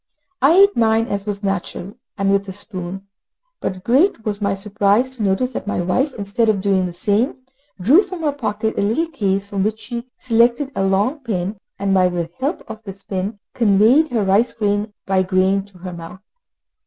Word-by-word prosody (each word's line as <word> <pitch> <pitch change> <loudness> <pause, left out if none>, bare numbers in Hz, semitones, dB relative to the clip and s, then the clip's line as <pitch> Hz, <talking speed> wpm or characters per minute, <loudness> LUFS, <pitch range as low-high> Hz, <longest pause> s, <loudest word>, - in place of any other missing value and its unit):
I 275 +4 +6
ate 400 +2 +6
mine, 225 -1 +3
as 200 0 -3
was 205 0 -3
natural, 195 0 -3 0.2
with 200 0 +1
a - - -4
spoon, 190 -1 -5 0.5
but 185 -1 -4
great 255 - +2
was 210 -1 -2
my 200 -1 +1
surprise 210 +4 +1
to 255 -3 -8
notice 210 +6 +1
that - - -5
my 205 - -1
wife, 250 - 0
instead 205 +2 0
of 210 -2 +2
doing 190 -1 +1
the - - -6
same, 220 +7 0 0.4
drew 260 - +6
from 370 -4 -7
her 295 - +2
pocket 220 -5 -2
a - - +2
little 225 +11 +1
case, 200 -11 -1
from 200 -1 -3
which 215 +2 0
she 235 +3 -6
selected 240 +3 +2
a 195 - -1
long 200 +10 +1
pin, 200 -5 -3 0.2
and 195 0 0
by 185 -1 +4
the 170 -2 -3
help 285 +7 -2
of 220 0 -8
this 195 -2 -10
pin 195 +2 -3 0.2
conveyed 230 +7 +4
her 235 -7 0
rice 215 +5 +3
grain 205 -1 -1
by 190 -1 +2
grain 190 +1 +1
to 200 -2 -19
her 180 0 -7
mouth. 170 +2 -9
205 Hz, 190 wpm, -20 LUFS, 195-235 Hz, 0.5 s, I